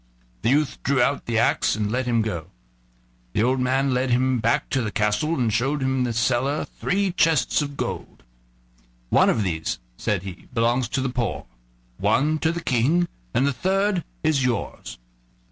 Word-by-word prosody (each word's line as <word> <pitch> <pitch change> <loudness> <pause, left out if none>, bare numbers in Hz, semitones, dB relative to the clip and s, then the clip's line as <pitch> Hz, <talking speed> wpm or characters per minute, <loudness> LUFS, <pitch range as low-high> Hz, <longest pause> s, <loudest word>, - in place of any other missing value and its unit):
The - - +1
youth 145 +2 +1
drew 140 -1 +1
out 140 +3 +1
the 115 -1 0
axe - - +2
and 105 -1 -2
let 125 +1 -1
him 115 -2 +2
go. 85 -7 -4 0.9
The 105 - +2
old 130 +2 +2
man 130 +1 +1
led 125 +1 0
him 125 +1 +2
back 115 +1 +1
to 135 - +1
the 110 - -2
castle 105 +9 0
and 120 -6 0
showed 135 +4 0
him 130 0 0
in 125 - +1
a 120 - -2
cellar 125 +5 +1
three 195 0 -1
chests 165 -4 +2
of 145 -1 -5
gold. - - -5 0.9
"One - - +5
of 110 - +1
these," 80 -4 -2 0.2
said 95 +4 -1
he, 95 -3 -9
"belongs 120 +1 +1
to 130 - -1
the 135 - -1
poor, 120 -5 -2 0.5
one 155 +3 +2
to 160 - +1
the 170 -1 -5
King, 150 +9 +2 0.3
and 130 - +3
the 140 - +1
third 190 +4 0 0.2
is 150 -4 +2
yours." 125 - -3
130 Hz, 180 wpm, -23 LUFS, 115-145 Hz, 0.9 s, One